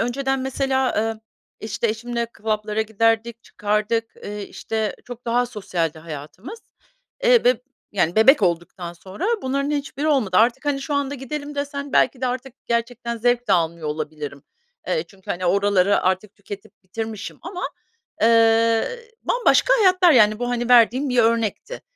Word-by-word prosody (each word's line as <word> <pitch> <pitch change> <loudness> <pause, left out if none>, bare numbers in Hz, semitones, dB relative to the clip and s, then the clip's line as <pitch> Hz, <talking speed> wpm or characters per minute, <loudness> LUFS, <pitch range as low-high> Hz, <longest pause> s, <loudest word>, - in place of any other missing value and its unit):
önceden 270 +2 -1
mesela, 265 -1 0
emm, 220 0 -1 0.4
işte, 220 +2 -2
eşimle 235 +2 -2
club'lara 215 0 -2
giderdik, 225 +1 0
çıkardık, 210 +2 -1 0.2
eee, 205 0 -5
işte, 220 -1 -3
çok 245 0 -10
daha 245 +1 +1
sosyaldi 175 -8 -3
hayatımız. 165 - -9 0.7
Eee, - - +5
beb 250 -1 +5 0.4
yani, 175 -1 0
bebek 230 +2 +6
olduktan 175 0 -1
sonra 190 - -6 0.2
bunların 275 +2 -1
hiçbiri 290 +1 -2
olmadı. 220 -11 +2
Artık, 240 +5 +3
hani, 280 -1 0
şu 290 +1 -3
anda, 285 0 -1
"Gidelim." 290 +2 -6
desen 285 0 -4
belki 255 0 +3
de 255 - 0
artık 255 +1 -4
gerçekten 235 0 -2
zevk 245 0 +1
de - - +4
almıyor 165 -2 0
olabilirim. 150 -2 -5 0.5
Eee, 485 - 0
çünkü, 190 -2 -12
hani, 180 0 -2
oraları 200 +1 +3
artık 190 +3 -1
tüketip 200 +1 -10
bitirmişim 220 +3 -6
ama, 360 +1 -6 0.6
eee, 230 - +4 0.2
bambaşka - - +3
hayatlar, 370 -4 +5
yani, 215 -4 +5
bu, 245 0 -2
hani, 240 0 -1
verdiğim 245 +3 +5
bir 250 -1 0
örnekti. 230 - 0
230 Hz, 150 wpm, -22 LUFS, 205-265 Hz, 0.7 s, bebek